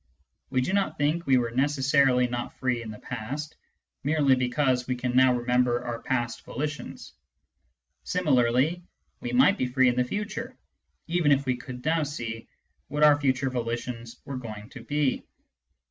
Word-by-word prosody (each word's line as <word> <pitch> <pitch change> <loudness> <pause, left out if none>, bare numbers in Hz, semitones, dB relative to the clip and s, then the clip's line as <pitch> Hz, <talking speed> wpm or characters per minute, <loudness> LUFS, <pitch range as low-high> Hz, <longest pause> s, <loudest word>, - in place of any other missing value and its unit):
We 130 - +1
do 185 - -1
not 200 -1 0
think 150 +4 0
we 130 -1 +5
were 120 -2 0
necessarily 135 -1 +3
not 120 0 -5
free 125 -2 0
in 115 - -7
the 105 - -7
past, 130 +7 -6 0.5
merely 145 -1 +3
because 125 0 +1
we 130 - 0
can 125 0 -2
now 130 0 +6
remember 125 0 +1
our 120 -1 -4
past 120 -3 -2
volitions. 150 +3 -5 0.9
Similarly, 145 -1 +2 0.4
we 245 - -4
might 245 -5 +4
be 125 - +1
free 130 0 +3
in 120 - 0
the 125 - +3
future, 215 - -5 0.5
even 165 -3 +2
if 140 0 +3
we 130 -1 +1
could 125 +1 -9
now 160 +1 +2
sec 120 -6 -5 0.4
what 150 +2 0
our 145 -1 +6
future 135 -1 +1
volitions 120 -1 -4
were 140 -3 -5
going 110 -4 -8
to 135 - -10
be. 145 -1 0
130 Hz, 160 wpm, -27 LUFS, 125-150 Hz, 0.9 s, now